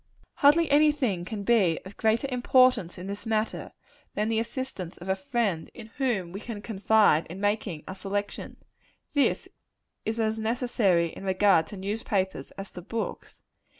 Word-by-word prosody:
Hardly 315 +4 +5
any 300 +1 +6
thing 225 - -1
can 205 +1 -5
be 200 -7 +3
of 195 +2 -10
greater 225 +4 +1
importance 250 -7 +3
in 180 - -7
this 200 +1 -6
matter, 220 0 -1 0.4
than 210 +1 0
the 225 -1 +1
assistance 230 -6 -5
of 175 - -10
a 190 - +3
friend, 195 -4 -1
in 225 -2 -11
whom 220 -11 0
we 195 - -6
can 220 -1 -6
confide, 210 -6 +3
in 175 +4 -8
making 205 -6 -1
our 185 - -5
selection. 200 +1 -4 0.6
This 285 -2 +2 0.6
is 220 +1 -2
as 220 0 0
necessary 220 -7 +1
in - - -10
regard 190 -3 +3
to 205 - -9
newspapers, 195 - -2
as 195 0 -7
to 180 - -8
books. 225 +5 -5
210 Hz, 160 wpm, -27 LUFS, 190-235 Hz, 0.6 s, any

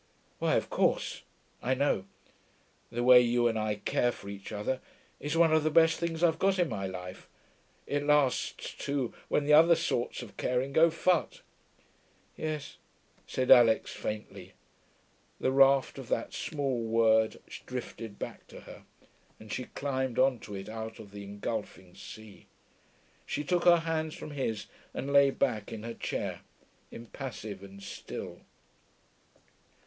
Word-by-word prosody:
'Why, - - +2
of - - -1
course - - +1 0.4
I 130 +2 +1
know. 130 -8 +1 0.8
The 120 +1 -2
way 125 0 +9
you 120 0 +2
and 110 -1 0
I 110 -1 0
care 120 +3 0
for 100 - -10
each 100 +1 -8
other 110 +5 -2 0.4
is 150 +3 -2
one 165 -1 +5
of 155 -1 +4
the 155 - +2
best 165 +1 +4
things 170 0 -2
I've 165 -1 +3
got 195 0 +2
in 175 -3 +2
my 95 -3 -3
life. 90 0 -8 0.6
It 145 0 -1
lasts, 150 -3 +1
too, 140 -4 -2
when 145 - +1
the 150 - +4
other 165 +3 +8
sorts 125 -5 -2
of 110 - -13
caring 125 +2 -1
go 165 +2 +6
phut....' 175 +1 0 0.9
'Yes,' 155 -2 -4 0.5
said 130 -1 0
Alix 115 -2 +6
faintly. 105 0 -6 0.9
The 130 - +1
raft 135 0 +4
of 130 - -8
that 115 - -1
small 135 -5 -2
word 110 -1 +3 0.3
drifted 115 -4 -6
back - - -7
to - - -12
her, - - -13 0.5
and 110 -1 -8
she 125 - -3
climbed 130 -3 -3
on 130 -2 +3
to 105 -1 -8
it 95 0 -7
out 110 0 -6
of 105 -3 -12
the 100 0 -8
engulfing 100 -2 -5
sea. 110 +1 -12 0.8
She 150 - -2
took 175 +3 0
her 170 -1 +7
hands 160 -1 -1
from 150 - -8
his 130 -7 -2 0.3
and 140 +1 -3
lay 140 -1 +7
back 120 -6 -1
in 110 -1 -6
her 115 0 -5
chair, - - -4 0.5
impassive 115 -4 -7
and 100 0 -12
still. - - -7
125 Hz, 155 wpm, -30 LUFS, 110-145 Hz, 0.9 s, way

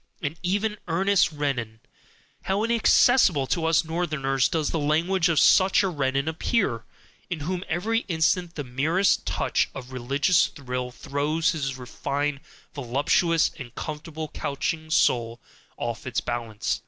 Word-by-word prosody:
And 145 +3 -3
even 205 +3 -1
Ernest 190 +3 +2
Renan: 135 -7 -3 0.7
how 195 +2 0
inaccessible 230 - +4
to 160 +4 -1
us 165 0 +3
Northerners 150 -6 0
does 155 -3 -1
the 165 - -1
language 165 +4 +1
of 160 -3 +3
such 190 +1 +5
a 195 - +1
Renan 135 -3 -1
appear, 160 - -1 0.4
in 170 -5 -4
whom 180 +4 -3
every 215 +7 0
instant 170 0 +1
the 145 - -4
merest 160 +8 +1
touch - - 0
of 130 -1 -8
religious 140 +8 +2
thrill 125 -3 -5
throws 145 +5 -1
his 135 -5 -3
refined 140 +3 -3 0.3
voluptuous 145 +5 +1
and 120 -3 -9
comfortably 155 0 -6
couching 155 +3 -3
soul 120 -6 +2 0.4
off 120 0 -4
its 120 -2 -1
balance! 115 -3 -3
155 Hz, 135 wpm, -25 LUFS, 135-175 Hz, 0.7 s, such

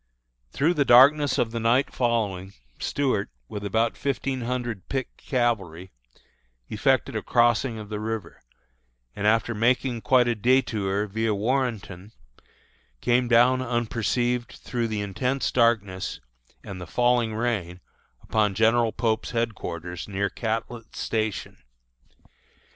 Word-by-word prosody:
Through 155 - +2
the 150 -4 +2
darkness 140 +3 +6
of 115 - 0
the 115 - -3
night 120 +4 +2
following, 105 -6 -1 0.3
Stuart, 130 -8 -1 0.2
with 105 +7 -6
about 110 +3 0
fifteen 135 -1 -2
hundred 120 -4 -4
picked 135 -1 -3
cavalry, 100 - -2 0.8
effected - - +1
a - - -1
crossing 120 0 +2
of 105 -1 -8
the 105 -1 -4
river, 110 -5 -5 0.7
and 105 - -1
after 115 +2 +2
making 120 +2 +1
quite 125 -2 +4
a 120 - +1
détour 105 -4 +1
via 110 +1 -1
Warrenton, 110 -4 -2 0.9
came 120 - +2
down 125 +2 +4
unperceived 120 0 -1
through 120 -2 -3
the 110 -2 -3
intense 125 +7 -1
darkness 110 -6 +1 0.4
and 95 -2 -8
the 90 - -7
falling 120 -2 +1
rain 105 -7 -2 0.4
upon 105 -3 +1
General 115 +2 +3
Pope's 110 +1 -1
headquarters 90 -7 -4
near 100 -1 -2
Catlett's 115 0 -4
Station. 110 -2 -2
115 Hz, 120 wpm, -25 LUFS, 105-125 Hz, 0.9 s, darkness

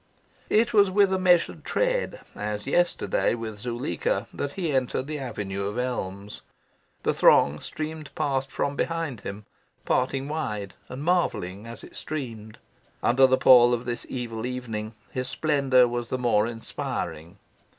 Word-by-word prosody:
It 225 +2 +3
was 200 -2 +6
with 195 0 +4
a 190 - +1
measured 180 -2 +3
tread, - - 0
as 105 0 -4
yesterday 175 -4 +1
with 110 -3 -6
Zuleika, 120 -6 -2
that 145 0 -3
he 175 -5 -2
entered 130 0 0
the 150 +1 -4
avenue 100 -6 -4
of 105 +3 -4
elms. 105 -5 -4 0.6
The - - +2
throng 75 +1 +5
streamed 155 -1 -6
past 135 -1 0
from 140 0 -2
behind 165 -9 -2
him, 100 +1 -7 0.4
parting 135 +2 0
wide, 115 -11 -3 0.2
and 130 +3 -6
marvelling 115 - 0
as 115 - -9
it - - -13
streamed. 115 -8 -6 0.5
Under 130 +2 +5
the 130 0 +3
pall 120 -2 +7
of 120 - -7
this 120 -1 -4
evil 120 -2 -4
evening 115 -4 -5 0.2
his 130 0 -3
splendour 140 -5 +3
was 120 0 -3
the 130 - -1
more 115 -3 +2
inspiring. 100 -6 -5
125 Hz, 150 wpm, -26 LUFS, 110-150 Hz, 0.6 s, pall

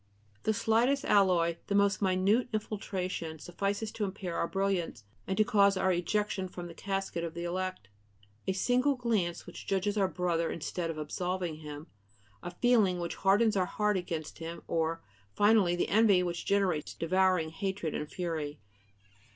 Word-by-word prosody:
The 220 - +3
slightest 230 +5 +2
alloy, 175 -4 +3
the 200 - 0
most 200 0 +3
minute 195 +6 +2
infiltration, 190 -6 -3
suffices 200 +6 -3
to 215 - -3
impair 190 -3 -4
our - - 0
brilliance 195 - -1 0.2
and 190 - -1
to 215 - +6
cause 200 -2 +4
our 190 - +2
ejection 190 +2 -1
from 180 -1 -8
the 170 - -8
casket 195 -2 -3
of 165 -1 -5
the 170 - -4
elect: 185 - -3 0.6
a 190 - +2
single 250 +8 +2
glance 220 -9 -1
which - - -10
judges 200 +2 0
our 195 - +3
brother 175 -2 0
instead 165 +2 -3
of 165 - -4
absolving 175 +2 -3
him, 150 -1 -8 0.6
a - - -5
feeling 195 -2 +3
which 170 -1 -3
hardens 205 +3 +3
our 185 -2 +2
heart 210 -1 +1
against 165 -4 -4
him, 165 +1 -6
or, 165 0 -1 0.3
finally, 205 -4 +4
the 175 - -1
envy 205 -4 +5
which 175 -1 -4
generates 190 -7 +1
devouring 185 -1 +2
hatred 190 -1 -3
and 150 - -4
fury. 160 -5 -3
185 Hz, 160 wpm, -31 LUFS, 170-205 Hz, 0.6 s, to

